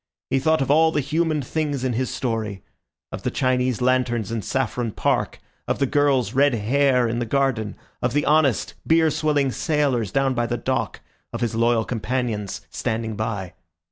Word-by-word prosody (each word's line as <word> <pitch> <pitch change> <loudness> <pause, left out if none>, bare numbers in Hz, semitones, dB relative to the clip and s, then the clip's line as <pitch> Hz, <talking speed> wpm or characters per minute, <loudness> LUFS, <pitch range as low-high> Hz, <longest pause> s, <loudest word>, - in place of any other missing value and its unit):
He 135 - +3
thought 155 +1 +2
of 135 - 0
all 160 +2 +5
the 150 - 0
human 155 +1 0
things 145 -1 -2
in 130 -2 0
his 130 +2 -1
story—of 115 -6 -6
the - - -1
Chinese 130 -2 0
lanterns 125 -4 +1
in 115 -1 -2
Saffron 120 0 -2
Park, - - 0 0.3
of - - 0
the 140 - +2
girl's 135 -5 +2
red 140 -1 +4
hair 125 +3 +2
in 115 +1 -2
the 120 - -1
garden, 120 -5 0 0.3
of 125 - 0
the 145 +1 +1
honest, 150 -5 +2
beer 160 -1 +4
swilling 145 -3 +1
sailors 135 - 0
down 135 +2 +1
by 120 -1 0
the 120 0 -2
dock, 130 +1 -2 0.3
of - - -5
his 120 -1 0
loyal 115 0 +2
companions 115 -4 -2
standing 110 0 -2
by. 100 -5 -3
130 Hz, 175 wpm, -23 LUFS, 115-140 Hz, 0.3 s, all